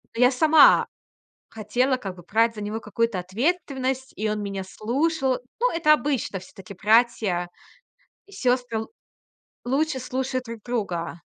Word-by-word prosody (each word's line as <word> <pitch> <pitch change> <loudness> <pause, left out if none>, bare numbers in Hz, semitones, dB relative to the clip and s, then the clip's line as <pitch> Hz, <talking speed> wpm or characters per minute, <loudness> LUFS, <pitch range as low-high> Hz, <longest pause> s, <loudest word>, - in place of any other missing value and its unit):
Ну, 235 - -1
я 250 - +7
сама 310 +4 +6 0.6
хотела 245 +5 0
как 195 -6 -6
бы 175 - -13
брать 230 +2 +3
за 210 - -6
него 210 +2 -3
какую-то 225 -1 -1
ответственность, 260 - -2
и 215 +1 -2
он 210 0 -2
меня 195 -1 -4
слушал. 265 - -1 0.2
Ну, - - +2
это 310 -2 +4
обычно 275 -10 -2
всё-таки 190 +1 -12
братья 210 -4 +2 0.8
и 400 - -20
сёстры 245 - 0
л - - -8 0.7
лучше 275 +3 0
слушают 255 0 -3
друг 230 -2 -8
друга. 180 -8 -3
235 Hz, 145 wpm, -24 LUFS, 210-265 Hz, 0.8 s, я